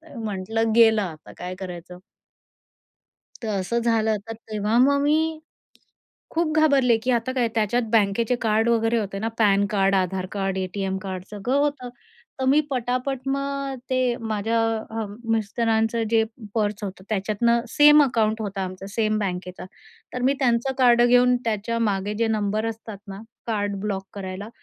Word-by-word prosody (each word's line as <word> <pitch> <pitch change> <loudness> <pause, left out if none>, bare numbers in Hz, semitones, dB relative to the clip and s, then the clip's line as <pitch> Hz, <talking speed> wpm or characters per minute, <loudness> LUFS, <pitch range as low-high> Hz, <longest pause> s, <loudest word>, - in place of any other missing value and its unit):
म्हटलं 220 +1 -2
गेलं, 225 -2 +6
आता 160 -5 -7
काय 180 +1 -6
करायचं? 180 -1 -8 1.4
तर - - -3
असं 235 +6 -1
झालं, 220 -2 +2
तर 225 - -4 0.2
तेव्हा 215 +2 0
मग 280 +2 +4
मी 310 +2 +1 0.9
खूप 325 -1 0
घाबरले 275 -6 +4
की 255 - 0
आता 240 +1 0
काय? 245 -3 +1
त्याच्यात 225 +2 +1
बँकेचे 225 +3 +2
कार्ड 220 +1 +2
वगैरे 230 0 +2
होते 195 -2 -3
ना, 225 +2 -1
पॅन 200 -2 +4
कार्ड, 195 -1 +2
आधार 185 0 0
कार्ड, 195 -2 -2
एटीएम 190 +1 -2
कार्ड, 185 -1 -6
सगळं 210 +6 -2
होतं. 285 -3 -1 0.5
तर - - 0
मी 290 +3 +5
पटापट 255 +1 -1
मग 275 0 -2 0.2
ते 255 - +1 0.2
माझ्या 220 +1 -1 0.4
अ, - - -1 0.3
मिस्टरांचं 225 +1 0
जे 225 -1 +4 0.3
पर्स 210 -2 -1
होतं, 190 -1 -7
त्याच्यातनं 215 +3 +1
सेम 295 +3 +7
अकाऊंट 220 -4 0
होतं 200 -1 -4
आमचं, 185 +1 -5
सेम 215 -1 +1
बँकेचं, 180 -2 -4 0.5
तर 250 - -3
मी 270 +2 +3
त्यांचं 245 0 +1
कार्ड 240 -2 +5
घेऊन 245 +1 +5
त्याच्या 225 +1 -1
मागे 200 +2 -2
जे 230 - +2
नंबर 215 0 0
असतात 220 -2 -6
ना 195 +1 -7 0.3
कार्ड 205 -3 -1
ब्लॉक 195 -2 -3
करायला, 195 +1 -6
220 Hz, 155 wpm, -24 LUFS, 200-245 Hz, 1.4 s, सेम